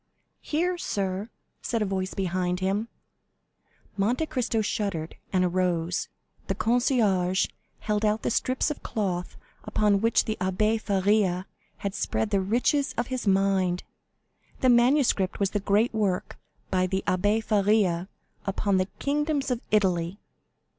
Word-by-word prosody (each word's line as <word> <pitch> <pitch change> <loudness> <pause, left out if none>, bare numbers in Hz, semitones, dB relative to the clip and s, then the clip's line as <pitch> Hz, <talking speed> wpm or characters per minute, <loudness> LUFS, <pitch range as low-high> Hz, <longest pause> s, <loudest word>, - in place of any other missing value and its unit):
"Here, 350 +3 -1
sir," 195 - -2 0.3
said 230 -2 -1
a - - 0
voice 190 -1 -2
behind 180 -1 -1
him. 195 +4 0 1.1
Monte 235 +10 +1
Cristo 240 -6 -1
shuddered, 195 -6 -2 0.2
and 185 -1 +2
arose. 175 -1 0 0.4
The 195 - -1
concierge 215 -6 +2 0.4
held 210 0 -1
out 215 +1 +1
the - - 0
strips 255 +5 +1
of 300 - -6
cloth 185 -5 -3 0.3
upon 205 -2 +2
which 230 0 +3
the 220 - -2
Abbé 210 +4 +1
Faria 195 -2 +1 0.3
had 200 -1 -3
spread 215 +1 -1
the 200 -2 +2
riches 245 +8 +1
of 240 +1 0
his 250 -4 -3
mind. 190 -2 +2 0.8
The 255 - +4
manuscript 240 -5 +3
was 200 -2 +1
the 205 - 0
great 205 +4 +2
work 200 -4 -1 0.3
by 185 -1 +2
the 190 +1 -1
Abbé 205 +4 +1
Faria 200 -4 +2 0.4
upon 195 0 +1
the 185 0 +1
kingdoms 290 -1 0
of 245 -1 -1
Italy. 185 -3 +1
200 Hz, 135 wpm, -26 LUFS, 185-225 Hz, 1.1 s, The